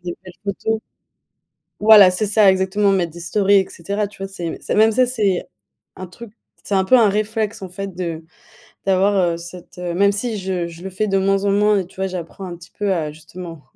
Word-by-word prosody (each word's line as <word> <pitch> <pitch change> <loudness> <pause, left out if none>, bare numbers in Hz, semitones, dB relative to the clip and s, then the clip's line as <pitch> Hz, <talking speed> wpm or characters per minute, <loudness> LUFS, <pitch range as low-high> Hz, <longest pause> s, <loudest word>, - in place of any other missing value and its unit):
des 175 -1 -4
belles 185 - -10
photos 220 +2 -2 1.0
voilà 210 -3 +8
c'est 185 +4 -1
ça 205 -1 +5
exactement 190 +2 +1
mettre 175 -4 0
des 175 - -10
stories 195 +4 +1
et 190 - -3
cetera, 200 +4 -3
tu 205 - -18
vois - - -2
c'est 175 -4 -5
c'est - - -3
même 220 +1 +5
ça, 255 +3 +3
c'est 210 -7 0 0.5
un 185 - -7
truc, 225 +4 -12 0.3
c'est 200 - -2
un 190 -1 +3
peu 255 +6 +5
un 220 -3 +5
réflexe 215 +1 -2
en 190 - -5
fait 195 +1 -7
de 165 -3 -4 0.6
d'avoir, 195 +2 +3 0.2
heu, - - -5
cette, 175 +1 -11
heu 175 -1 -4
même 200 +3 +3
si 220 +2 -2
je 185 -2 -2
je 170 0 -12
le 190 - -6
fais 215 +4 -1
de 195 - +1
moins 195 +1 +1
en - - +3
moins 210 0 +3
et 180 - -5
tu 185 - -21
vois 190 0 -1
j'apprends 180 +1 -7
un 175 - -6
petit 170 +1 -15
peu 205 -2 +1
à 160 -4 -1
justement 165 0 -10
195 Hz, 225 wpm, -20 LUFS, 180-205 Hz, 1.0 s, voilà